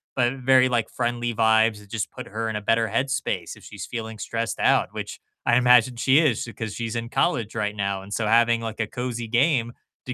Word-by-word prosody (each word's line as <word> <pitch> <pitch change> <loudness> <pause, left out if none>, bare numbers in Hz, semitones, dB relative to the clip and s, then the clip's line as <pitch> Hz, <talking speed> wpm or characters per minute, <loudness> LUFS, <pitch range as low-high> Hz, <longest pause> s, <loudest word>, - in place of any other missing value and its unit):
But 125 -1 +2
very, 130 0 +4
like, 120 -3 0
friendly 120 -1 -2
vibes 110 -1 +3
that 105 -1 -17
just 110 -2 -3
put - - -9
her 110 +2 -3
in 110 - -2
a - - -5
better 115 +2 +2
head 130 +6 0
space 115 -10 -3
if - - -17
she's - - -8
feeling 110 -1 -6
stressed 115 +2 -3
out, - - +3
which - - -7 0.2
I 120 - +4
imagine 125 0 +5
she 130 +4 +4
is 130 -7 +1
'cause 110 -2 -5
she's 115 0 -3
in 115 0 -4
college 125 -9 0
right 105 -2 -2
now, 100 -1 -2
and 100 +1 -9
so 110 0 -1
having, 115 +1 +4
like, 115 -1 -5
a 110 - -1
cozy 120 0 -4
game 120 0 +1 0.3
to 125 - -4
115 Hz, 225 wpm, -24 LUFS, 110-125 Hz, 0.3 s, imagine